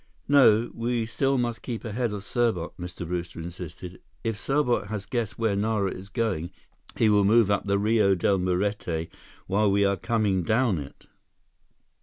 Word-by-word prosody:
"No, 120 -5 +5
we 115 0 -1
still 135 +4 0
must 120 -2 -2
keep 120 -2 -5
ahead 115 +1 -1
of 105 -2 -5
Serbot," 110 -6 0
Mr. 90 0 -6
Brewster 85 -1 -4
insisted. 85 +1 -8 0.2
"If 115 -1 -1
Serbot 125 -1 0
has 100 -2 -5
guessed 120 -4 -3
where 110 -3 +1
Nara 100 -2 0
is 95 +2 -9
going, 100 -7 -1 0.5
he 115 - +3
will 105 -1 +4
move 105 0 +4
up 100 - 0
the 100 0 +1
Rio 105 -1 +3
Del 95 +2 +1
Muerte 90 -3 -1 0.4
while 100 +2 +2
we 100 +1 +3
are 100 0 +1
coming 105 -2 0
down 110 0 +1
it." 70 -1 -10
105 Hz, 165 wpm, -26 LUFS, 95-115 Hz, 0.5 s, No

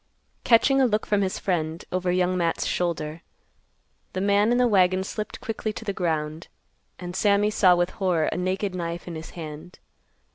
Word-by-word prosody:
Catching 270 +3 +4
a 260 - +5
look 215 -1 0
from 205 -1 +1
his 190 -1 -1
friend, 165 -3 -2
over 185 0 0
Young 180 0 +1
Matt's 170 -2 0
shoulder, 165 -2 -2 0.9
the 185 - -2
man 205 +3 +3
in 245 - +3
the 250 0 +4
wagon 185 -3 +3
slipped 210 +2 -5
quickly 220 -1 -3
to 225 - -8
the 200 - -2
ground, 160 -3 -2 0.5
and 180 -1 -7
Sammy 205 +1 +3
saw 185 -4 +5
with 175 +1 0
horror 180 -5 0
a - - -2
naked 185 +2 -1
knife 170 -1 -4
in 175 - -5
his 160 0 -7
hand. 160 +2 -8
185 Hz, 180 wpm, -25 LUFS, 170-205 Hz, 0.9 s, a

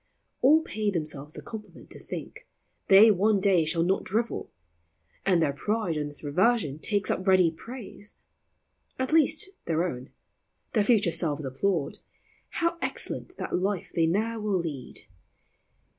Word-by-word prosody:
All 305 +5 +6
pay 215 -8 -2
themselves 155 -5 -3
the - - -9
compliment 215 -2 -10
to - - -8
think - - -8 0.4
They 205 +3 +8
one 205 +2 +3
day 190 -4 +3
shall 165 +1 +1
not 190 +3 +1
drivel: 225 +3 -2 0.8
and 185 -3 +4
their 145 -3 +1
pride 205 +3 -1
On 150 -1 -2
this 145 +1 -9
reversion 155 - +1
takes 205 +2 0
up 185 - -3
ready 185 -3 +5
praise; 210 +2 -10 0.8
At 260 +3 -1
least, 320 +4 +3
their 165 0 +1
own; 130 -5 -6 0.6
their 215 - +3
future 205 -6 +3
selves 155 -3 -1
applaud: 145 +4 -1 0.5
How 335 0 -1
excellent 365 - -4
that - - -3
life 195 -2 -2
they 165 -1 +2
ne'er 220 +6 0
will 210 -3 0
lead 150 -7 -5
190 Hz, 145 wpm, -27 LUFS, 160-220 Hz, 0.8 s, They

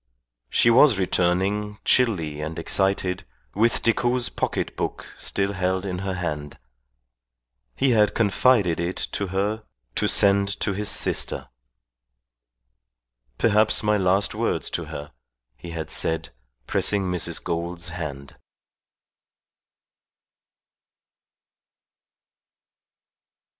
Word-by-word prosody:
She 115 - +4
was 125 -1 +6
returning, 95 +3 0
chilly 85 -12 +2
and 80 +1 -5
excited, 95 +1 0 0.3
with 115 +3 +1
Decoud's 120 +2 +1
pocket - - -3
book - - -4
still 100 0 0
held 95 0 -1
in 90 -2 -3
her 95 0 -3
hand. 75 -5 -4 1.2
He 135 - +2
had 105 -3 +3
confided 105 -4 +3
it 85 +2 -2 0.2
to 100 - -2
her 100 +4 -1 0.3
to - - 0
send 100 0 +3
to 100 - 0
his 105 +1 -1
sister. - - +1 1.9
"Perhaps 110 - +3
my 105 0 +3
last 95 +1 +2
words - - -1
to - - -3
her," 75 0 -8 0.4
he 85 +7 -10
had 80 -1 -5
said, 80 -5 -2 0.3
pressing 100 +9 +1
Mrs. 90 -3 -1
Gould's 85 0 -3
hand. 75 -5 -7
95 Hz, 100 wpm, -24 LUFS, 85-105 Hz, 1.9 s, was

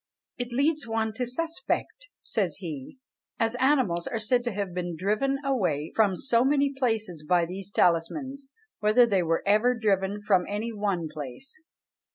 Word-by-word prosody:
"It 245 0 -3
leads 285 +2 +1
one 225 -1 -1
to 250 - -1
suspect," 330 - -3 0.2
says 185 -8 -1
he, 160 - -7 0.4
"as 225 0 +1
animals 255 -11 +2
are 225 - -2
said 240 +3 +1
to 240 - 0
have 200 -3 -3
been 175 -1 -3
driven 215 - +1
away 180 - 0
from 200 -4 +3
so 235 0 +2
many 280 +1 +2
places 220 - -1
by 175 +2 +3
these 185 +3 -6
talismans, 265 - 0 0.3
whether 215 +4 +5
they 200 -5 +2
were 165 -1 0
ever 215 +5 +4
driven 200 -2 +1
from 200 -4 +2
any 215 +3 -3
one 200 -6 -1
place." 155 - -8
215 Hz, 160 wpm, -27 LUFS, 180-255 Hz, 0.4 s, whether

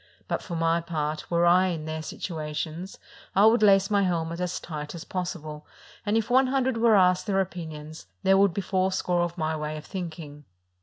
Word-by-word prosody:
But - - -2
for 175 - -6
my 165 +1 +1
part, 155 -2 -3
were 170 0 +2
I 180 +2 +5
in 165 -4 -3
their 160 0 -4
situations, 160 +2 -5 0.4
I 200 - +6
would 225 +1 +5
lace 195 -1 +5
my 200 -1 +3
helmet 170 -3 -1
as 180 -1 -2
tight 150 -1 -6
as 170 - -7
possible, 155 -5 -5 0.4
and 210 +2 +2
if 225 -1 0
one 260 +1 +4
hundred 260 -2 0
were 225 -1 +5
asked 180 0 +3
their 195 -1 +1
opinions, 160 - -5 0.2
there 190 - +5
would 200 -1 +5
be 200 - -3
fourscore 185 -1 0
of 175 0 -2
my 160 -1 -1
way 155 0 -4
of 150 - -9
think 175 -5 -5
ing." 150 -3 -10
175 Hz, 200 wpm, -26 LUFS, 155-195 Hz, 0.4 s, I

